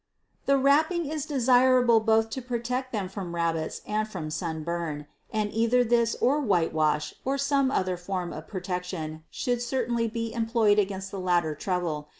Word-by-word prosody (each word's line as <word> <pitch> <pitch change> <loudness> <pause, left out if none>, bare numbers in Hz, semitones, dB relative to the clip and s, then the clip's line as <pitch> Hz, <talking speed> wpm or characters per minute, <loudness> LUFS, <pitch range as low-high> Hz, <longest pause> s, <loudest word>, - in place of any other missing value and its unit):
The 275 0 +5
wrapping 315 +6 +3
is 305 0 -3
desirable 250 -3 +4
both 220 0 +2
to 260 - -4
protect 250 +1 -3
them 205 -5 -2
from 185 -3 -6
rabbits 165 -2 -1
and 215 +1 -1
from 170 -7 -6
sunburn, 160 -2 -3 0.3
and 210 -1 -1
either 230 +2 +3
this 235 -1 +2
or 280 +4 +3
whitewash 160 - +1
or 270 +1 0
some 275 -1 +2
other 185 -8 0
form 180 0 -4
of 155 - -8
protection 180 -4 -4
should 245 -2 -2
certainly 240 -2 0
be 230 0 -4
employed 225 -2 +2
against 195 -1 -2
the 195 - -5
latter 175 -4 +1
trouble. 155 -3 -3
215 Hz, 155 wpm, -27 LUFS, 175-245 Hz, 0.3 s, The